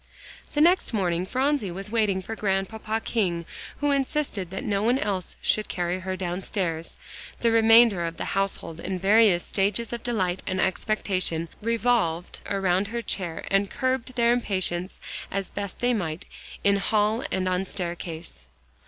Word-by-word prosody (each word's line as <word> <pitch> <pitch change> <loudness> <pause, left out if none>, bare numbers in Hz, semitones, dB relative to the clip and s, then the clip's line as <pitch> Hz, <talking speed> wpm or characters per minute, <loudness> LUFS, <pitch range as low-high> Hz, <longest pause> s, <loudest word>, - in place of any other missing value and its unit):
The 295 - +3
next 350 -4 +4
morning 180 -3 0
Phronsie 265 -3 +1
was 195 +4 -6
waiting 205 -5 +1
for 225 - -5
Grandpapa 215 +2 -1
King, 175 -9 0 0.3
who 290 0 +1
insisted 275 - -1
that 190 - -5
no 200 -1 0
one 240 +4 +3
else 195 -8 -2
should 215 - +2
carry 175 +1 -1
her 185 0 -4
downstairs, 175 -2 -2 0.4
the 235 - +3
remainder 225 -4 +6
of 165 0 -4
the - - -3
household 190 -4 -2
in 185 +2 -3
various 195 -1 +5
stages 210 +4 0
of 235 - -4
delight 190 -7 0
and 185 - -1
expectation, 185 -4 0
revolving 225 -7 +1 0.2
around 195 0 +1
her, 235 +2 -4 0.5
and 195 0 +3
curbing 260 -1 -1
their 235 -1 +4
impatience 185 -6 -1 0.3
as 195 -1 -3
best 200 -2 -5
they 245 0 +3
might, 170 -7 -3 0.4
in 200 0 +4
hall 210 +3 +1
and 185 0 0
on 185 0 +1
staircase. 170 - -6
195 Hz, 150 wpm, -26 LUFS, 180-230 Hz, 0.5 s, remainder